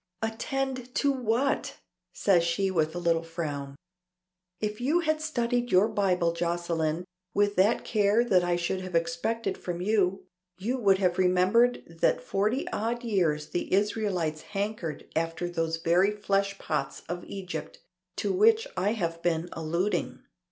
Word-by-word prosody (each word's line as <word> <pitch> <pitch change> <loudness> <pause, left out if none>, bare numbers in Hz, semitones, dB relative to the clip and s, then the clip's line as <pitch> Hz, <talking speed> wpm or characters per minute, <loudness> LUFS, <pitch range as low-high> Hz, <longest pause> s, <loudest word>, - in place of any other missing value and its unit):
"Attend 255 +2 -3
to 285 - +3
what?" 255 +1 0 0.4
says 180 -4 +3
she 180 +3 0
with 160 -2 0
a - - -2
little 170 -1 +2
frown. 150 -5 -5 0.8
"If 210 +1 -3
you 305 +8 +2
had 310 -1 0
studied 245 -3 -1
your 190 +4 +5
Bible, 185 -6 +1
Jocelyne, 170 -1 -1 0.3
with 205 0 +2
that 200 +5 +3
care 210 +1 +3
that 185 -7 +3
I 175 0 +1
should 175 +2 -1
have 185 -2 -6
expected 230 +5 -1
from 175 -1 -4
you, 195 -1 +1 0.3
you 235 +8 -2
would 195 -4 +4
have 180 -2 +1
remembered 185 +7 +3
that - - +2
forty 210 +7 0
odd 235 +3 -2
years 170 -9 0
the 175 - -3
Israelites 190 -6 0
hankered 200 -6 -4
after 165 +2 -1
those 165 -1 -1
very 170 +4 +3
fleshpots 200 -1 -1
of 175 +1 -4
Egypt 195 -2 -6 0.4
to - - -1
which 445 +4 +4
I 205 - +1
have 165 -6 -3
been 170 0 0
alluding. 170 +5 -2
195 Hz, 145 wpm, -28 LUFS, 170-225 Hz, 0.8 s, your